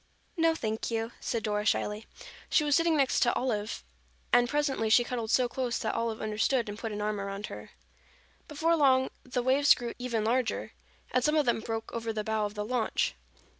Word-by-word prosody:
"No, 330 -2 +3
thank 220 -6 -3
you," 225 0 -2
said 230 -2 -2
Dora 210 -1 0
shyly. 210 0 -1 0.4
She 305 - +3
was 290 -1 +3
sitting 330 -1 +3
next 275 -2 +3
Olive 225 -4 -1 0.5
and 245 0 +5
presently 275 -6 0
she 240 +2 +6
cuddled 240 -2 -4
so 250 +1 +3
close 250 -1 -2
that 220 - -2
Olive 230 -1 -2
understood 220 +3 +1
and 205 +1 -6
put 225 - -4
an 210 0 -3
arm 210 -1 -1
around 200 +1 -4
her. - - -9 0.8
Before 325 +2 +1
long 260 -4 +3
the 250 -1 -3
waves 275 +3 +5
grew 240 -2 -5
even 235 -3 -1
larger 245 +1 0 0.4
and 255 - +2
some 300 +2 +2
of 300 -2 +3
them 240 -2 +2
broke 225 0 -5
over 230 -1 -2
the 215 -1 -3
bow 220 -1 0
of 205 - -12
the 210 0 -3
launch. 240 -1 0
235 Hz, 195 wpm, -29 LUFS, 220-260 Hz, 0.8 s, she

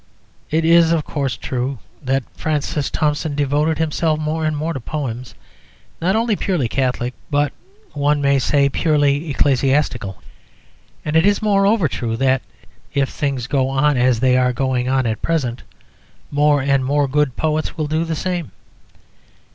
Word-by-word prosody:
It 160 +1 +1
is, 165 0 +5
of 165 -2 +2
course, 135 -5 -2
true 130 +1 -3 0.2
that 135 -1 0
Francis 150 -2 -2
Thompson 150 0 -1
devoted 145 +2 +1
himself 155 0 0
more 155 +1 -1
and 155 -1 -1
more 160 +3 -2
to 135 - -4
poems 125 -2 -5 0.7
not 185 +4 +2
only 225 -1 +1
purely 175 -11 0
Catholic, 125 0 -1 0.2
but, 145 -1 +1 0.4
one 145 0 +1
may 140 -1 +3
say, 140 +2 +2
purely 145 +1 +1
ecclesiastical. 135 -7 +1 0.9
And 150 - -2
it 160 - +5
is, 205 +1 +3
moreover, 200 -2 +3
true 115 -4 -3
that 130 0 +2 0.5
(if 140 -1 +2
things 135 -4 -2
go 130 0 0
on 140 +2 +2
as 125 -2 +2
they 130 -1 +4
are 125 0 +2
going 130 0 -1
on 130 -1 +1
at 110 -2 -2
present) 130 -7 -1 0.7
more 145 -1 +3
and 140 -1 +2
more 140 +2 +1
good 145 -1 +1
poets 155 0 -1
will 155 - -1
do 155 +2 0
the 165 -1 -2
same. 175 -1 -3
145 Hz, 155 wpm, -19 LUFS, 130-155 Hz, 0.9 s, is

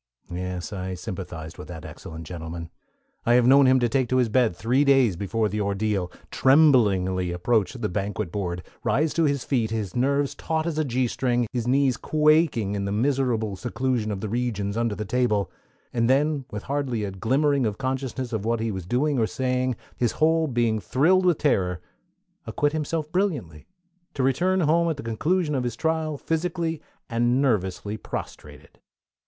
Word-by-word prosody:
Yes, 90 +3 -4
I 95 -1 -4
sympathized 90 -5 -7
with - - -8
that 80 -3 -8
excellent 80 0 -9
gentleman. 85 0 -7 0.5
I 120 - +3
have 125 -1 +5
known 135 +1 +6
him 130 0 +5
to 120 - +3
take 130 0 0
to 130 - +2
his 125 -3 +2
bed 115 -4 +2
three 125 +8 +2
days 135 -8 +4
before 105 +4 -1
the 105 +1 -2
ordeal, 100 -2 -1 0.2
tremblingly 105 - +4
approach 100 +4 +1
the 120 -5 -3
banquet 100 -1 -3
board, 90 -3 -3 0.2
rise 150 +8 +1
to 165 - +2
his 140 -3 0
feet, 120 -5 0
his 110 -5 -3
nerves 140 +3 +1
taut 160 0 -2
as 160 -2 -2
a - - +2
G 130 -2 0
string, 120 0 0
his 120 -2 -2
knees 130 -1 +3
quaking 155 -8 +2
in 100 -1 -2
the 100 - -2
merciful 115 -3 0
seclusion 120 +1 -1
of 100 -2 -4
the 110 - -3
regions 105 -3 -2
under 115 -2 0
the 105 - -4
table, 105 -3 0 0.4
and 115 0 +1
then, 145 +1 +2
with 105 0 -6
hardly 135 -5 -2
a 100 - -3
glimmering 135 +6 +1
of 105 -1 -3
consciousness 130 -1 -3
of 110 -3 -2
what 115 +1 0
he 110 0 -1
was 95 -3 -6
doing 135 +5 +1
or 110 - +2
saying, 130 0 -1 0.2
his 120 -2 0
whole 160 +1 +2
being 120 -4 +1
thrilled 170 - +3
with 175 -4 +3
terror, 90 - +1 0.7
acquit 145 0 0
himself 155 0 -2
brilliantly, 140 - -2 0.5
to 135 - 0
return 180 +9 +2
home 170 +2 +3
at 160 - -2
the - - -7
conclusion 150 +9 0
of 130 -3 0
his 120 -2 -3
trial 160 +2 -1
physically 165 +1 -2 0.3
and 120 +2 +1
nervously 105 -5 0
prostrated. - - -8
120 Hz, 180 wpm, -25 LUFS, 105-140 Hz, 0.7 s, known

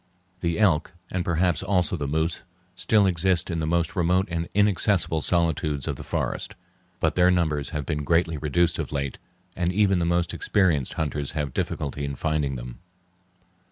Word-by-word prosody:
The 85 -2 -1
elk 90 -7 +2 0.2
and 90 -1 -1
perhaps 85 -1 +1
also 95 -2 +1
the 75 -4 -3
moose 80 +3 -1 0.3
still 105 +3 +3
exist 90 0 +1
in 85 - -2
the 80 - -1
most 85 0 0
remote 90 +2 +2
and 85 0 -2
inaccessible 100 -5 +2
solitudes 80 -4 0
of - - -1
the - - -8
forest, - - -3 0.4
but - - +1
their 90 0 +4
numbers 80 -5 +1
have 75 -3 -4
been 75 -3 -2
greatly 85 0 +1
reduced 85 +3 +1
of 75 - -3
late, 70 -2 -3 0.4
and 90 0 0
even 95 -1 +3
the 85 - +1
most 85 0 +1
experienced 85 -10 +1
hunters 75 -3 -2
have 75 -4 -3
difficulty 70 -1 -3
in 70 -1 -3
finding 75 -2 -1
them. - - -8
85 Hz, 170 wpm, -25 LUFS, 75-90 Hz, 0.4 s, their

